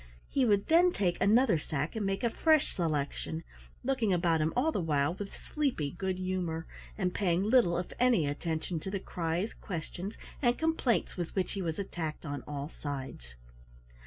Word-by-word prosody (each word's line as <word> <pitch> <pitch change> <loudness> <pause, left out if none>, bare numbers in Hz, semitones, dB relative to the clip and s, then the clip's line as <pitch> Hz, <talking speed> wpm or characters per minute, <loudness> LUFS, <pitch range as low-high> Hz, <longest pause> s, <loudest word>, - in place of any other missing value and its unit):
He 270 -2 +2
would 205 -3 +3
then 345 +2 +5
taken 180 - 0
another 215 -3 +5
sack 150 +3 -3
and 220 - -1
make 195 +3 -1
a 235 - +2
fresh 315 +2 +3
selection, 160 0 -2 0.4
looking 245 -5 +1
about 170 -3 +3
him 155 +1 +2
all 280 +6 +3
the 200 - -1
while 150 -1 +1
with 195 +1 -7
sleepy 265 - -1
good 190 +2 -2
humor, 180 -3 -2 0.3
and 180 -3 0
paying 180 -2 +1
little 210 -6 +4
if 180 - -4
any 245 -10 +4
attention 160 +3 -2
to 190 - -5
the 195 0 -2
cries, 175 +3 -2
questions, 180 +2 -5 0.3
and 240 -2 +3
complaints 320 -11 +1
with 175 -2 -4
which 190 -2 0
he 195 - -3
was 165 -3 -2
attacked 170 -5 -4
on 145 -2 -3
all 145 -1 -4
sides. 135 - -6
180 Hz, 175 wpm, -31 LUFS, 160-220 Hz, 0.4 s, then